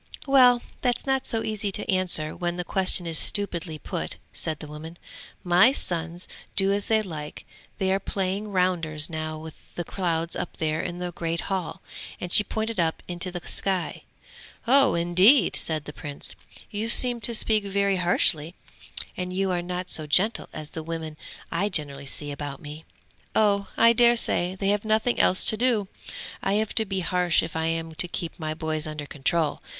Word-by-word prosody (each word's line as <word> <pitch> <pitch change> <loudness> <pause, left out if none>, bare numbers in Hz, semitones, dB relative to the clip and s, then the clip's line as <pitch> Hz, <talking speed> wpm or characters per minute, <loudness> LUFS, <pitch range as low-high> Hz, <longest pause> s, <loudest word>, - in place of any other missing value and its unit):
'Well 250 -3 +5 0.2
that's 245 -2 0
not 270 -1 0
so 225 -1 -1
easy 210 -2 -1
to - - -3
answer 180 -5 +1
when 175 0 -3
the 180 - -2
question 185 -1 0
is 165 -2 +7
stupidly 170 -5 0
put,' - - -5 0.2
said 155 -2 -4
the 155 - -8
woman. 155 +3 -9 0.5
'My 180 +7 +6
sons 175 -7 -2 0.3
do 195 0 +5
as 200 0 -1
they 220 -1 +2
like; 155 -6 -7 0.3
they 190 -1 0
are 195 - +2
playing 195 +2 -3
rounders 175 -5 +1
now 155 0 -4
with 160 0 -9 0.2
the 175 - -3
clouds 170 -2 -2
up - - -5
there 155 0 -1
in 175 - -5
the 180 0 -4
great 165 0 -3
hall,' 190 -4 -3 0.4
and 180 - -5
she 210 - +5
pointed 220 0 -3
up 165 -1 0
into 180 +1 -2
the 175 -1 -7
sky. 190 -3 -2 0.6
'Oh 270 0 +5
indeed!' 180 +7 +5
said 155 -3 -1
the 150 - -8
Prince. 145 -1 -6 0.4
'You 215 +2 -2
seem 240 0 +4
to 235 +1 +7
speak 215 -1 +3
very 200 -1 +1
harshly, 170 -2 +1 0.6
and 180 0 -4
you 190 +1 0
are 175 -1 0
not 180 +1 -5
so 155 -1 0
gentle 210 +9 +1
as 155 -1 -8
the 160 - -5
women 160 -1 -5 0.4
I 195 +5 0
generally 140 -6 -3
see 145 +1 -4
about 140 -1 -6
me!' 150 +2 -9 0.5
'Oh, 200 -2 +3
I 230 0 +6
daresay 235 -6 +3
they 195 +1 -1
have 205 0 +1
nothing 220 +2 +1
else 185 - +4
to 220 - +4
do! 230 -4 +2 0.5
I 195 - 0
have 215 +1 0
to 220 - +2
be 190 -2 -2
harsh 180 -1 +1
if 160 - -7
I 160 0 0
am 165 0 -3
to 170 +3 +1
keep 170 -1 -5
my 155 -1 -3
boys 155 -1 -3
under 155 -1 -5
control! 150 +3 -1
180 Hz, 185 wpm, -25 LUFS, 160-205 Hz, 0.6 s, is